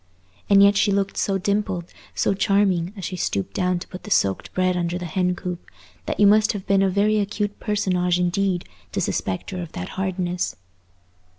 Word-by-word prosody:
And 200 -1 +7
yet 200 0 +6
she 205 0 +3
looked 195 0 0
so 195 -1 0
dimpled, 195 -3 -2 0.2
so - - +2
charming, 195 -3 +2
as 190 - -5
she 185 - -4
stooped 100 - -2
down 180 0 +1
to 175 - -8
put 185 - -9
the - - -10
soaked 100 - +1
bread 185 0 +2
under 175 0 -1
the 180 - -5
hen 180 +2 0
coop, 180 0 -5 0.4
that - - -2
you 205 - +6
must 215 +2 +5
have 200 -3 -6
been 195 0 +3
a 195 - +3
very 210 +3 +2
acute 205 0 -2
personage 180 -4 +1
indeed 180 0 0 0.3
to - - -1
suspect 95 - -2
her 185 -1 -4
of 170 - -8
that 90 - -5
hardness. 180 -2 -2
185 Hz, 195 wpm, -23 LUFS, 180-200 Hz, 0.4 s, And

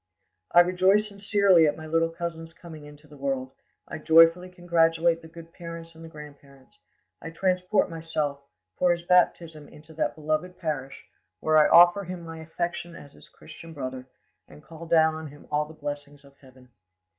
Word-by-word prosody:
"I 175 - +7
rejoice 185 +4 +2
sincerely 200 -4 +3
at 145 - -1
my 155 - -9
little 165 +1 0
cousin's 165 -1 -7
coming 160 -4 -12
into 150 +1 -15
the 150 -1 -16
world; 135 -1 -3 0.4
I - - -7
joyfully 165 +3 +5
congratulate 170 -1 +1
the 160 - -13
good 165 0 -14
parents 165 -1 -9
and 165 0 -14
the 165 - -10
grandparents; 140 -7 -15 0.4
I - - -7
transport 180 +3 0
myself, 160 -4 -4 0.4
for 180 - +3
his 170 0 -7
baptism, 170 -4 +1
into 160 +2 -16
that 160 - -2
beloved 155 +4 -3
parish, 145 -5 -5 0.3
where 155 0 +3
I 150 - +5
offer 175 +3 +6
him 180 0 -7
my 165 -1 -9
affection 170 +1 -5
as 145 - -13
his - - -17
Christian 165 -1 -13
brother, 130 -2 -6 0.4
and 75 - -16
call 165 +1 -12
down 160 -1 +3
on 160 0 -7
him 145 0 -15
all 150 0 0
the 155 - -13
blessings 145 -1 -8
of 140 0 -20
heaven. 130 -2 -20
165 Hz, 175 wpm, -25 LUFS, 150-170 Hz, 0.4 s, I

